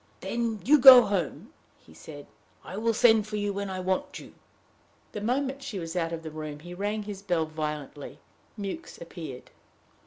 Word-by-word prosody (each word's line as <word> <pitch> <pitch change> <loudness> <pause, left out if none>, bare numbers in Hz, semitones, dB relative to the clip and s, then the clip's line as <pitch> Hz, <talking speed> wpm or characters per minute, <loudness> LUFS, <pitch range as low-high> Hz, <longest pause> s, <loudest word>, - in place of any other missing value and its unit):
"Then 230 -3 -2
you 295 +4 +6
go 255 -1 +11
home," 195 -7 -3 0.2
he 80 - -20
said. 145 - -11 0.4
"I - - -8
will 225 +3 0
send 220 -2 +4
for 215 - -5
you 205 -1 -1
when 200 0 -4
I 185 -1 -4
want 185 0 -2
you." - - -12 0.8
The 210 - -6
moment 265 +4 -1
she 270 -7 -6
was 165 -2 -6
out 165 -2 -1
of 165 -1 -5
the 160 - -7
room, 155 -1 -7
he 175 +2 -10
rang 205 +3 -3
his 200 -2 -7
bell 175 -5 0
violently. 150 -2 -6 0.4
Mewks 205 - -7
appeared. 165 -7 -9
195 Hz, 180 wpm, -27 LUFS, 160-220 Hz, 0.8 s, go